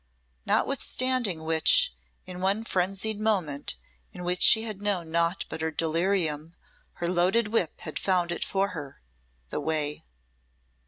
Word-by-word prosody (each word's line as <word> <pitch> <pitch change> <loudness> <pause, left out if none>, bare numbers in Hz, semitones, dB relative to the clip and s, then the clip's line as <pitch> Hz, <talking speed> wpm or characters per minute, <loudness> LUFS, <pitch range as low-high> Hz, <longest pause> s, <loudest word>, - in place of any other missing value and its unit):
Notwithstanding 255 -9 +1
which, 160 - +4 0.3
in 180 0 -7
one 200 +4 +1
frenzied 195 +1 -1
moment 180 - -1 0.4
in 180 - -9
which 180 +1 -1
she 220 - +7
had 215 -3 -6
known 185 -6 -2
naught 170 +2 +1
but 160 - -6
her 160 - 0
delirium, 165 -1 0 0.4
her 170 - -4
loaded 185 +6 +2
whip 210 -7 0
had 155 - -5
found 180 -3 +1
it 175 - -2
for 195 0 0
her 150 -7 -8 0.5
the - - -2
way! 150 -1 -1
180 Hz, 140 wpm, -27 LUFS, 160-200 Hz, 0.5 s, she